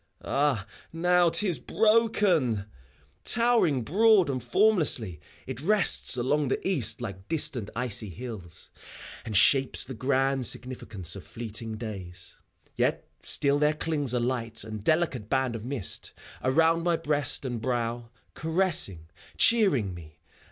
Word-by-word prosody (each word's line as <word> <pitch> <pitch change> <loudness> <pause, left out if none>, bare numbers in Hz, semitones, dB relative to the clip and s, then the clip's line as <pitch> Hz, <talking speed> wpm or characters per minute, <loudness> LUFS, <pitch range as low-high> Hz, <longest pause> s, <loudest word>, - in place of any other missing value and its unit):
Ah, 135 -8 0 0.3
now 175 +1 +3
't 170 +5 +1
is 170 -8 0
broken 210 - +2
I 100 - -5 0.6
Towering 230 - +3
broad 200 - +3
and 130 -2 -3
f - - -15
ormlessly. 155 - +2 0.3
It 130 -1 -6
rests 195 -6 +3
along 140 +4 0
the 130 - -2
east 120 - 0
like 100 -4 -7
distant 130 -9 +1
icy 115 -3 -1
hills. 95 -4 -9 0.5
And 110 -3 -1
shapes 135 +5 +3
the 130 - -8
grand 135 +1 +1
significance 110 -8 -2
of 100 - -9
fleeting 115 -1 -6
days. 95 -6 -8 0.4
Yet - - -1
still 140 0 +1
there 150 +1 +2
clings 150 -5 -1
a - - +1
light 120 -3 -1
and 110 -1 -8
delicate 140 -7 0
band 130 -3 0
of 110 - -7
mist 125 -7 -3 0.3
Around 165 +5 +2
my 170 0 +1
breast 145 -4 +1
and 120 -3 -4
brow, 120 -1 -3 0.2
caressing, 160 - 0 0.3
cheering 185 - +3
me. 80 -3 -12
130 Hz, 135 wpm, -27 LUFS, 110-165 Hz, 0.6 s, now